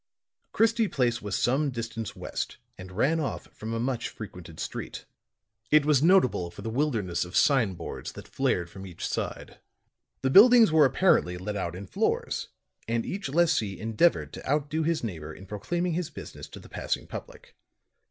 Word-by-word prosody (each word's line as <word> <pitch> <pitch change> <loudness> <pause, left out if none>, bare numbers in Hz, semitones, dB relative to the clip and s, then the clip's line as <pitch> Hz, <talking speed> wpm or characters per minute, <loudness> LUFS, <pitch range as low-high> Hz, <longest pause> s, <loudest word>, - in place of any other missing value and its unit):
Christie 225 0 +3
Place 120 -7 0
was 105 -1 -3
some 140 +4 +2
distance 115 -3 -5
west - - -4 0.2
and 95 -2 -10
ran 140 - +2
off 150 - -3
from 110 +1 -6
a 115 - -1
much 120 -1 -1
frequented 90 -6 -10
street. - - -5 0.6
It 150 -1 +5
was 150 -3 +4
notable 155 - +4
for 85 - -11
the 115 - -3
wilderness 115 - 0
of 90 +1 -8
sign 120 -10 +3
boards 85 - -6
that - - -10
flared 85 -1 0
from 95 +3 -10
each 85 -2 -5
side. - - -4 0.6
The 130 - +2
buildings 230 - +8
were 155 -2 +6
apparently 130 - +3
let 105 +3 -4
out 85 -3 -3
in 95 +2 -7
floors - - -1 0.4
and 115 0 0
each 195 -6 -4
lessee 145 - +2
endeavored 115 +10 +2
to - - -8
outdo 150 +2 0
his 160 -2 0
neighbor 85 -9 -5
in 95 - -12
proclaiming 170 - -2
his 175 -1 -2
business 145 - -9
to - - -11
the - - -14
passing - - -3
public. - - -10
120 Hz, 170 wpm, -27 LUFS, 100-155 Hz, 0.6 s, buildings